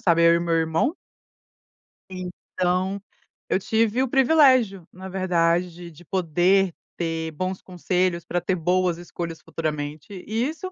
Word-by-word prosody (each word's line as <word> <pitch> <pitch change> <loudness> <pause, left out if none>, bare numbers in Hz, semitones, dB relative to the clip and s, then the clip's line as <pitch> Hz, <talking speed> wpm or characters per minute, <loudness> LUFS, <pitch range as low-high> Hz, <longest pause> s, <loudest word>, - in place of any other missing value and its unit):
sabe 170 -2 +3
eu 170 - +6
e 170 - +2
meu 170 -1 0
irmão. 165 - +1 1.2
Então, 185 +1 -2 0.5
eu - - +2
tive 225 +4 +1
o 265 - 0
privilégio, 260 - +4
na 190 +1 -9
verdade, 175 -1 0
de 165 +3 -16
poder 180 +2 +2 0.2
ter 165 -1 -2
bons 185 +4 -4
conselhos 180 -1 -1
para 175 0 -1
ter 185 +2 0
boas 180 0 +1
escolhas 170 -1 -6
futuramente, 150 +1 -4 0.2
e 225 +5 0
isso, 370 +4 -6
180 Hz, 135 wpm, -24 LUFS, 170-195 Hz, 1.2 s, eu